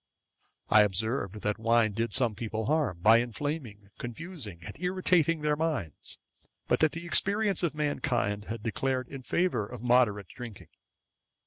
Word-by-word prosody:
I 110 - +7
observed, 105 +1 -1
that 105 +1 -1
wine 115 -1 +3
did 115 +3 -1
some 120 -4 +1
people 110 +1 -4
harm, 140 - 0
by 110 +4 +7
inflaming, 120 -4 -4
confusing, 120 - -6
and - - -8
irritating 180 -3 +2
their 150 0 +2
minds; 150 - -3 0.5
but - - +2
that 155 -1 +3
the 165 +1 -5
experience 200 +2 +2
of 170 -4 -1
mankind 125 -9 -1
had 115 -1 -6
declared 130 +2 -1
in 135 - -7
favour 130 - 0
of 120 -1 -9
moderate 115 -6 +3
drinking. 120 -5 -9
120 Hz, 145 wpm, -29 LUFS, 105-155 Hz, 0.5 s, I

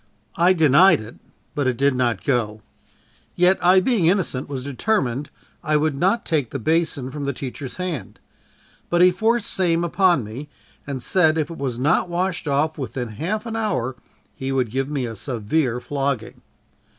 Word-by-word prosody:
I 180 +1 +4
denied 165 +2 +5
it, 110 +2 -10 0.4
but 145 -3 -1
it 125 -2 0
did 140 0 +3
not 125 -2 0
go 110 -6 -1 0.7
yet 180 +2 +3
I 185 +2 +6
being 190 -4 +2
innocent, 170 -8 0
was 135 -3 -4
determined 140 - -1 0.3
I 155 -2 +2
would 150 -1 0
not 190 +10 +1
take 150 -8 0
the - - -4
basin 150 -1 0
from 145 0 -5
the 140 - -1
teacher's 130 +1 -6
hand; 180 -7 -5 0.7
but 175 0 +4
he 180 - +7
forced 225 +4 +1
same 170 -2 +1
upon 175 -4 +2
me 125 +8 -8 0.4
and 135 -3 -4
said 160 -4 +3
if 155 +1 -1
it 165 - -8
was 130 -4 -2
not 150 +7 +1
washed 180 -1 -2
off 150 +3 0
within 125 -2 -4
half 180 - -3
an 225 -1 -4
hour, 130 - -1 0.4
he 135 0 -4
would 130 -4 0
give 135 +2 -1
me 140 -4 -2
a 115 -1 -6
severe 125 +3 -1
flogging. 135 -3 -3
145 Hz, 175 wpm, -22 LUFS, 130-175 Hz, 0.7 s, he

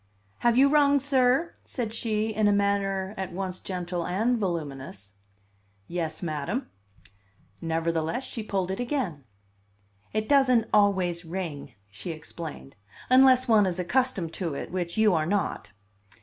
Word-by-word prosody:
"Have 240 0 +3
you 275 +2 +7
rung, 285 -1 +4
sir?" 270 +3 +2
said 230 -4 -4
she, 220 -1 -1
in 215 0 +2
a - - +5
manner 200 -1 0
at 190 -1 -4
once 185 0 -4
gentle 180 -2 -4
and 225 +8 0
voluminous. 140 - -4 0.7
"Yes, 165 -1 -4
madam." 165 - -3 0.9
Nevertheless 165 +5 -1
she 240 - -5
pulled 190 -3 -2
it 190 - -4
again. 235 - -2 0.9
"It 215 0 -1
doesn't 260 -5 +4
always 190 -4 +3
ring," 160 -6 -6 0.2
she 105 - -7
explained, 155 -3 -8 0.4
"unless 260 0 +6
one 215 -4 +5
is 180 -1 -2
accustomed 185 -2 0
to 170 -6 -3
it, - - -6
which 175 0 -3
you 215 -2 +5
are 155 -2 +1
not." 200 -1 -1
195 Hz, 135 wpm, -27 LUFS, 170-235 Hz, 0.9 s, you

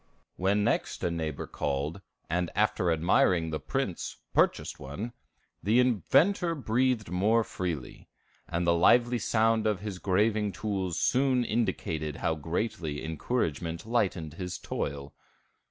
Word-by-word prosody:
When 100 +3 +1
next - - 0
a 85 - +1
neighbor 80 -3 -3
called, 70 +6 -3 0.3
and 90 +1 0
after 105 -3 +2
admiring 80 0 +3
the 75 - -2
prints, 70 - -3 0.2
purchased - - +1
one, 100 - -6 0.5
the 110 +7 +3
inventor 150 - +3
breathed 125 - 0
more 105 +6 +3
freely; 85 -9 -5 0.4
and 85 0 -1
the 85 - +4
lively 120 +8 +4
sound 110 0 +2
of 105 -3 0
his 100 -3 -5
graving 105 +2 +1
tools 95 -5 -2
soon 130 +1 +2
indicated 80 -10 -1
how 80 - 0
greatly 80 -1 -3
encouragement 80 - -2
lightened 95 -9 0
his 90 +1 -5
toil. 70 0 -4
95 Hz, 125 wpm, -29 LUFS, 80-110 Hz, 0.5 s, the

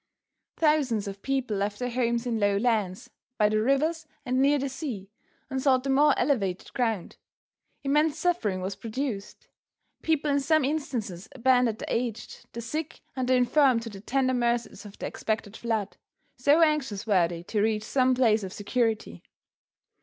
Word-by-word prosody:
Thousands 280 -10 +2
of 200 0 -7
people 260 -5 -1
left 205 +1 -1
their 250 -1 -3
homes 235 -1 0
in 235 -2 -1
low 205 -1 +2
lands, 210 -5 -1 0.3
by 210 -1 +4
the 215 0 +1
rivers 305 +6 +1 0.2
and 255 +1 +1
near 285 +2 +4
the 275 0 -2
sea 255 - -6 0.4
and 265 0 -3
sought 260 -2 +3
the 270 - 0
more 290 +1 +4
elevated 205 -9 0
ground. 225 -7 -1 0.7
Immense 300 +2 +2
suffering 310 - 0
was 190 +1 -3
produced. 220 0 -5 0.5
People 310 -2 +1
in 285 - +3
some 305 +1 +2
instances 240 - -3
abandoned 250 -3 +3
the - - -4
aged, 230 -2 -4
the 235 - -5
sick 305 +7 -5
and 260 -2 -2
the 260 - +5
infirm 255 0 +4
to 230 - -6
the 195 -1 -10
tender 260 +3 +1
mercies 240 -2 -1
of 200 - -14
the - - -5
expected 215 -1 -3
flood, 220 -4 -2 0.4
so 285 +6 +4
anxious 270 -10 0
were 190 -6 +3
they 170 0 -7
to 210 +3 -1
reach 215 0 +1
some 255 +2 +2
place 225 -4 +3
of 190 - -5
security. 210 - -1
240 Hz, 170 wpm, -27 LUFS, 210-275 Hz, 0.7 s, the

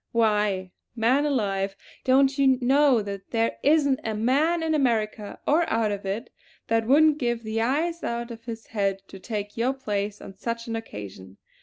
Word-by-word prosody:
Why, 210 -5 +1 0.2
man 255 +6 +2
alive, 195 -7 -1 0.3
don't 270 +1 +4
you 265 -2 +5
know 265 -2 +4
that 200 -1 -7
there 230 -1 0
isn't 285 -3 +3
a 220 -1 -2
man 290 +10 +2
in 320 -1 0
America, 220 -7 0
or 325 +3 +2
out 220 -2 +1
of 200 -1 -4
it, 205 +6 -4 0.4
that 225 -1 +1
wouldn't 300 +3 +5
give 240 -3 -1
the 220 +1 -2
eyes 320 +8 0
out 235 0 -3
of 230 0 -10
his 230 -1 -7
head 195 -3 -1
to 195 - -10
take 205 0 -5
your 245 +3 +1
place 210 -5 -3
on - - -10
such 230 +4 -4
an 230 - -4
occasion. 100 - -8
230 Hz, 175 wpm, -25 LUFS, 205-270 Hz, 0.4 s, you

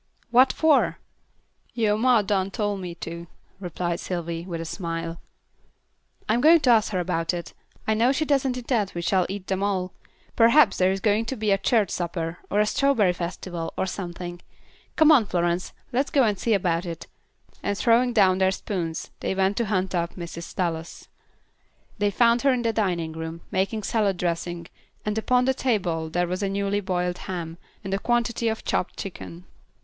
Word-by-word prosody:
"What 255 +2 +6
for?" 315 -3 +3 0.8
"Yo' 220 -3 +2
ma 235 0 +4
done 195 -1 0
tole 205 -1 -1
me 180 -3 -6
to," 170 0 -7 0.3
replied 175 -1 -3
Sylvy, 170 -2 -4
with 170 -3 -4
a 165 - -4
smile. 165 -1 -4 1.1
"I'm 230 +3 +2
going 325 +4 +7
to 250 - +4
ask 220 -2 +3
her 185 - 0
about 175 -1 -1
it. 170 - -7 0.3
I 220 - +2
know 230 +4 +3
she 310 +3 0
doesn't 270 -3 +1
intend 235 -5 -1
we 170 - -3
shall 185 0 +2
eat 195 -1 -5
them 190 0 -2
all. 190 -2 -1 0.4
Perhaps 235 0 +5
there 185 0 +4
is 195 0 -2
going 215 +2 +2
to 265 - -3
be 215 -3 0
a 195 - +4
church 210 +1 +2
supper, 170 -1 -3
or 205 - +1
a 210 - +4
strawberry 220 -6 +2
festival, 175 -1 -5
or - - 0
something. 175 -2 -6 0.5
Come 315 0 +6
on, 275 -7 +6
Florence, 175 0 -1 0.2
let's 270 +4 +1
go 275 - +3
and 210 -4 +1
see 225 -2 +2
about 175 -3 0
it." 165 -1 -6 0.6
And 200 0 -1
throwing 240 +2 +3
down 190 -5 +4
their 190 0 +4
spoons, 180 -4 -4
they - - -2
went 190 +1 +1
to 235 - +1
hunt 190 -2 -1
up 170 -1 -1
Mrs. 170 -1 -8
Dallas. 165 -2 -3 0.9
They 205 0 +2
found 235 +3 +3
her 275 - +4
in 250 -2 0
the 230 -1 +1
dining 175 -7 -1
room, 160 +1 -6
making 205 +2 -1
salad 200 -3 +1
dressing, 175 0 -2 0.4
and 210 0 -1
upon 250 +2 +2
the 265 - +3
table 180 -11 -1
was 175 +2 -1
a 200 - 0
newly 200 +1 0
boiled 180 -2 -2
ham, 170 -2 -5 0.2
and 195 - -4
a 195 - 0
quantity 235 0 0
of 220 0 -2
chopped 185 - -1
chicken. 180 -2 -8
195 Hz, 185 wpm, -25 LUFS, 175-225 Hz, 1.1 s, going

